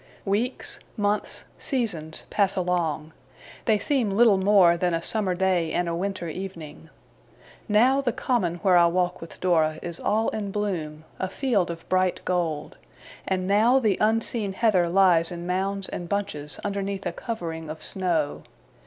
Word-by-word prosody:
Weeks, 215 +6 -2 0.2
months, 205 0 -1 0.2
seasons, 180 - -2
pass 200 -1 +2
along. 170 -4 -1 0.5
They 220 -3 +4
seem 250 0 0
little 205 0 +4
more 190 -3 +5
than 175 0 0
a 165 - -3
summer 200 -3 0
day 180 -3 +1
and 175 - 0
a 170 - -1
winter 185 0 -3
evening. 165 -3 -8 0.8
Now, 250 +6 +4
the 255 -3 0
Common 220 -8 0
where 185 -3 +5
I 170 0 +6
walk 180 +1 0
with 165 - -10
Dora 160 -4 +2
is 170 -1 -5
all 220 +2 +1
in 210 -2 -4
bloom, 175 -7 -3 0.2
a 190 - -2
field 205 -4 0
of 165 -1 -7
bright 185 -1 +1
gold; 170 -5 -2 0.5
and 185 -1 0
now 220 +6 +4
the 220 -7 +1
unseen 220 -1 +1
heather 190 -5 +2
lies 175 -2 +4
in 175 0 -6
mounds 190 +2 -1
and 175 -1 -6
bunches 195 -8 -3
underneath 200 -1 -3
a - - -1
covering 165 -9 -5
of 155 +1 -6
snow. 170 -6 0
190 Hz, 155 wpm, -25 LUFS, 170-205 Hz, 0.8 s, I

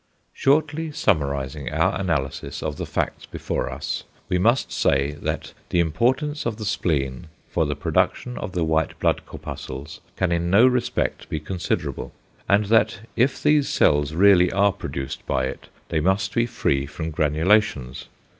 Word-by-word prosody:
Shortly 155 +3 +1
summarising 70 - 0
our - - +1
analysis 70 -8 -2
of - - -3
the - - -4
facts - - -2
before - - -3
us, - - -4 0.3
we 90 - +1
must 115 +8 +2
say 70 +1 +2
that - - -3 0.2
=the 90 - +1
importance 125 - +1
of 110 -3 -3
the 110 - -5
spleen 80 -6 -1 0.2
for - - +1
the - - -2
production 125 0 0
of 95 - -5
the 85 - 0
white 80 -1 0
blood - - +1
corpuscles 65 +3 -8 0.2
can 95 -2 +1
in 85 0 0
no 100 +7 +6
respect 125 -2 0
be 80 - -2
considerable=, 85 +4 -3 0.4
and 100 +1 +4
that 110 +1 +2
if 130 +4 +1
these 150 -1 +4
cells 75 +1 +2
really 90 -1 +6
are 100 +1 +3
produced 65 -4 -5
by 65 - +1
it, 65 - -7 0.2
they 80 - +1
must 95 +5 +1
be 115 0 +2
free 70 - 0
from 80 +3 -5
granulations. 80 - +1
90 Hz, 155 wpm, -23 LUFS, 75-115 Hz, 0.4 s, no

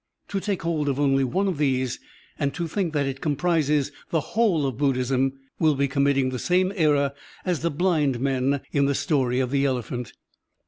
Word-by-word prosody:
To 200 - -1
take 195 -2 -2
hold 155 -3 0
of 135 0 -1
only 135 -1 +3
one 185 +10 0
of 180 -6 -2
these 130 -4 0 0.4
and 140 -1 -1
to 170 -1 -2
think 175 0 -1
that 145 -2 +1
it 135 0 -4
comprises 150 -2 +1 0.2
the 165 - +1
whole 205 -10 +2
of 130 -2 -3
Buddhism 135 -1 +1 0.3
will 155 -2 +3
be 140 +1 +1
committing 135 -1 +2
the 125 - -3
same 185 +5 +2
error 145 -5 +2 0.3
as 180 -3 0
the 170 - 0
blind 150 -5 +1
men 135 +1 0
in 140 -1 +2
the 140 - +1
story 130 -7 +1
of 130 -1 0
the 140 -1 +2
elephant. 125 -3 -2
140 Hz, 190 wpm, -25 LUFS, 135-165 Hz, 0.4 s, only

